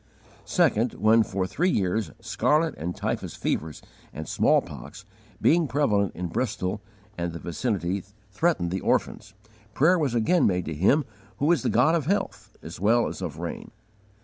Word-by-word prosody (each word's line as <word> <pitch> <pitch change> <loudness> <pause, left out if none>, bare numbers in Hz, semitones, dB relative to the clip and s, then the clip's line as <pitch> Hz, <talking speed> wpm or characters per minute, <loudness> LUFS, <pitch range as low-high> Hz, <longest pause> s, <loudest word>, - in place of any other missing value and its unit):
Second, 115 +3 +2
when, 110 +2 +4
for 95 -3 -1
three 175 - 0
years, 105 - 0
scarlet 150 +7 +1
and 85 +3 -4
typhus - - -3
fevers 80 -1 -3 0.3
and 80 0 -7
smallpox, 100 +7 0 0.3
being 165 -1 +3
prevalent 105 -9 +1
in 90 - -4
Bristol 105 0 -2 0.4
and 85 -1 -2
the - - -5
vicinity 95 0 -2 0.3
threatened 100 - 0
the 95 - -2
orphans, - - -1 0.4
prayer 170 +6 +4
was 140 -6 0
again 120 +10 +3
made 90 -2 0
to 80 - -4
Him 105 - +3 0.3
who 145 +4 +2
is 170 -7 +2
the - - 0
God 125 +8 +4
of 160 -4 0
health 200 +3 -2
as 85 +2 -9
well 115 +4 +3
as - - -6
of 80 -5 -5
rain. 85 +1 -6
105 Hz, 160 wpm, -26 LUFS, 90-145 Hz, 0.4 s, when